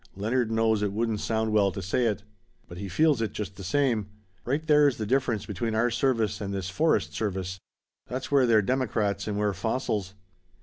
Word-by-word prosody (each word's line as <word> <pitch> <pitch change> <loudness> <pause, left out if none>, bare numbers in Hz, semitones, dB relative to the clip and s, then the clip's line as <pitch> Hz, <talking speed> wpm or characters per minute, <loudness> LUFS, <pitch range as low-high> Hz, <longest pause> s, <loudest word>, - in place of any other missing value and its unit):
"Leonard 115 +4 0
knows 110 -1 +2
it 105 -1 0
wouldn't 110 0 -1
sound 110 0 -1
well 100 -2 +3
to 95 - -6
say 95 +7 0
it. 105 -2 -2 0.4
But 85 - -9
he 100 0 -5
feels 145 - +3
it, 110 -3 -2
just 100 -2 -5
the 100 - -9
same. 115 0 +1 0.4
Right 145 +6 -1
there's 150 -4 +4
the 110 - -3
difference 120 -2 0
between 110 +2 -3
our 120 +2 +2
service 115 -4 0
and 100 -1 -3
this 95 -1 -3
forest 100 - +1
service. 95 -3 -3 0.5
That's 130 +3 -5
where 135 -3 +4
they're 110 -2 +4
democrats 105 -5 0
and 105 -1 -2
we're 105 -1 +1
fossils. 100 -1 -2
110 Hz, 190 wpm, -27 LUFS, 100-125 Hz, 0.5 s, there's